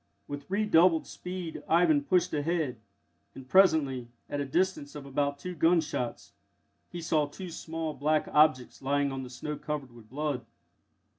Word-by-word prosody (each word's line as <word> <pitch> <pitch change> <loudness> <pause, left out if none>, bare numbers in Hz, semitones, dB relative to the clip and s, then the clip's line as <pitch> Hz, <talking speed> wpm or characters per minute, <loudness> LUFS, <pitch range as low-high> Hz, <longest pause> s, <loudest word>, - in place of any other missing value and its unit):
With 145 +1 -7
redoubled 185 -5 +4
speed 180 -2 -6
Ivan 160 -3 +4
pushed 180 +3 +2
ahead, 150 -5 -1 0.6
and, 130 -1 -10
presently, 145 -7 +4 0.2
at 145 - -1
a - - -1
distance 150 -1 -1
of 145 -2 -7
about 140 +1 -1
two 180 +5 -6
gunshots, 160 -6 0 0.6
he 175 - -6
saw 155 -3 +2
two 175 +5 -8
small 160 -1 -4
black 155 +2 +1
objects 150 -5 +3
lying 140 +1 +1
on 135 0 -4
the 130 - -7
snow 150 +4 -5
covered 150 -3 -4
with 115 -2 -16
blood. 145 -1 -2
150 Hz, 150 wpm, -29 LUFS, 140-170 Hz, 0.6 s, redoubled